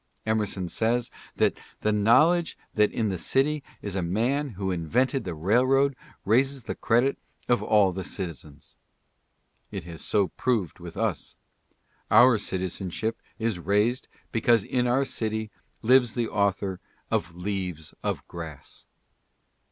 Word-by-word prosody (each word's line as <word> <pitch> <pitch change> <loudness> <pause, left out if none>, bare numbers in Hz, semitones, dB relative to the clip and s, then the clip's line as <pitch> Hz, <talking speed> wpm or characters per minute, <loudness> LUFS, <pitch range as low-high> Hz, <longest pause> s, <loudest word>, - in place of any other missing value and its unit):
Emerson 105 -4 0
says 115 +6 0 0.2
that - - +2
" - - -30
the 105 - +3
knowledge 155 +12 +4 0.2
that 105 -1 +3
in 110 -2 0
the 95 -3 -3
city 145 - +1 0.2
is 100 -2 -4
a 95 - 0
man 120 +12 0
who 95 -1 -1
invented 120 - 0
the 90 -3 -4
railroad 130 - +3 0.3
raises 130 +5 +2
the - - -4
credit 120 +4 +1 0.3
of 120 - +3
all 105 -3 +4
the 95 +1 -4
citizens." 85 -7 -7 0.9
It 100 -4 -5
has 85 -1 -9
so 100 -3 +1
proved 110 - -1
with - - -9
us. - - -2 0.7
Our 120 +1 +7
citizenship 95 +4 -3 0.2
is 110 -5 -1
raised 105 +8 +1 0.2
because 115 -2 +3
in 125 +2 0
our 130 +3 +2
city 110 -3 -3 0.3
lives 125 0 +4
the 120 -2 0
author 100 -2 0 0.3
of 85 0 -1
"Leaves 90 -4 -4
of - - -3
Grass." 80 -5 -9
110 Hz, 135 wpm, -26 LUFS, 95-125 Hz, 0.9 s, Our